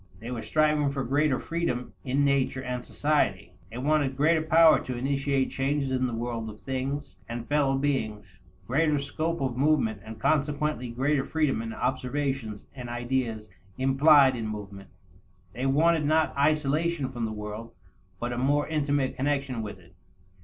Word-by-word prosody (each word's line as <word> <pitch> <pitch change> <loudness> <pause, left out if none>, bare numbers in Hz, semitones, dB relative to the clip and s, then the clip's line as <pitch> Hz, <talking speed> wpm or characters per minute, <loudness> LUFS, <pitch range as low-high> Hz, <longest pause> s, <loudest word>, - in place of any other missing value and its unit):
They 115 +3 -7
were 120 -2 -3
striving 150 0 +2
for 140 -1 -2
greater 140 +2 +2
freedom 165 -8 -3
in 140 +2 +1
nature 135 -1 +1
and 125 -1 -4
society. 115 - 0 0.2
They 115 - -8
wanted 140 0 +1
greater 160 +3 +3
power 160 0 +6
to 125 -1 -5
initiate 135 +1 0
changes 135 0 -1
in 130 0 +1
the 120 - -4
world 115 -1 -3
of 105 0 -11
things 135 +1 -4
and 120 0 -5
fellow 140 -2 +2
beings; 105 -9 -2 0.3
greater 150 +6 +2
scope 155 +3 -2
of 130 -3 -1
movement 130 -8 +2
and 110 0 -9
consequently 150 -2 0
greater 135 +4 +1
freedom 150 -6 0
in 115 0 -5
observations 130 -3 -2
and 125 -3 -7
ideas 120 -3 -2 0.3
implied 135 +1 +5
in 115 -2 -3
movement. 100 -2 -7 0.6
They 125 +3 -2
wanted 160 +3 +3
not 160 +1 +2
isolation 150 0 +1
from 120 -3 -3
the 110 - -3
world, 105 +2 -6 0.5
but 120 +1 -2
a 120 - -3
more 145 +3 +2
intimate 145 -3 0
connection 135 -3 -1
with 105 -2 -6
it. 90 -1 -20
135 Hz, 160 wpm, -27 LUFS, 120-145 Hz, 0.6 s, power